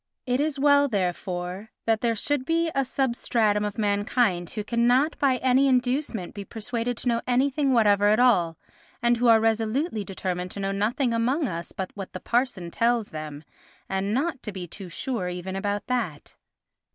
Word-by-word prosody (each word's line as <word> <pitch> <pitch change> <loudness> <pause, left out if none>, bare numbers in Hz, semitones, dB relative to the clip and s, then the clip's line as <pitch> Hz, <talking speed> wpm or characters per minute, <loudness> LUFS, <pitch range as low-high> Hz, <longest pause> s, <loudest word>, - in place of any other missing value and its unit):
It 250 +1 0
is 295 0 0
well, 285 0 +5
therefore, 185 -1 -3 0.2
that 225 -1 +2
there 230 -1 +1
should 285 +5 0
be 330 +3 +1
a 275 - +2
substratum 235 -5 +1
of 210 +1 -3
mankind 205 -3 +1
who 210 - -4
cannot 245 +7 +2
by 265 -3 +3
any 260 +2 +3
inducement 250 - 0
be 205 - -6
persuaded 230 +3 -3
to - - -5
know 235 -1 +2
anything 270 +3 +2
whatever 205 -4 +4
at 215 +2 +4
all, 175 -10 +3 0.5
and 240 0 +3
who 245 +1 +2
are 225 -1 +7
resolutely 225 - 0
determined 185 -2 -4
to - - -7
know 195 0 -1
nothing 230 +6 0
among 255 +6 +1
us 170 -2 -5
but 190 -1 -5
what 195 -2 -8
the 185 - -5
parson 235 -9 -1
tells 230 0 +1
them, 155 -1 -7 0.4
and 195 +1 -1
not 270 +3 -1
to 210 - -5
be 190 -2 -6
too 185 +2 -8
sure 185 +1 -3
even 180 +1 -5
about 205 +1 -2
that. 225 -13 -3
225 Hz, 175 wpm, -25 LUFS, 195-255 Hz, 0.5 s, are